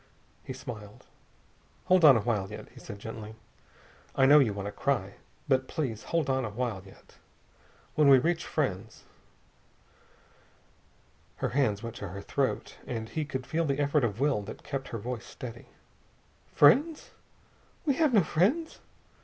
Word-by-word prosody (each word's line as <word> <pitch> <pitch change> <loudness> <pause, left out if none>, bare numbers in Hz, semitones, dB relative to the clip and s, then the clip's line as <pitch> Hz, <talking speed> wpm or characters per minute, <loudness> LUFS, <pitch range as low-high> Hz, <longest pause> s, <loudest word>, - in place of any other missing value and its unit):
He - - -7
smiled. 110 -5 -9 0.8
"Hold 185 -1 +4
on 140 -6 +9
a - - 0
while 105 -4 -1
yet," 105 - -9
he 125 - -15
said 110 -5 -9
gently. 110 +1 -8 0.8
"I 135 - +4
know 145 +3 +8
you 125 -7 +3
want 100 -1 -5
to 100 - -3
cry. 105 -9 -1 0.3
But 130 -2 +2
please 125 -9 -3
hold 165 -4 0
on 130 -1 +1
a 115 - -3
while 110 -2 -3
yet. 95 - -18 0.8
When 150 -2 +4
we 135 - +9
reach 165 +6 0
friends...." 110 - -3 2.3
Her - - -2
hands 120 -6 +1
went 115 0 -6
to 100 - -5
her 100 +2 -7
throat, - - -2
and 110 -2 -4
he 155 -1 -2
could 130 -3 -5
feel 165 +4 -1
the 140 -2 0
effort 145 0 +2
of 110 -2 -1
will 140 -6 +2
that 100 - -9
kept 135 -1 -4
her 115 - -5
voice 120 +1 -5
steady. 120 -2 -9 0.8
"Friends? 290 - +4 0.7
We 285 - +3
have 310 -4 +3
no 210 -6 +5
friends." 235 - +1
130 Hz, 160 wpm, -29 LUFS, 110-150 Hz, 2.3 s, on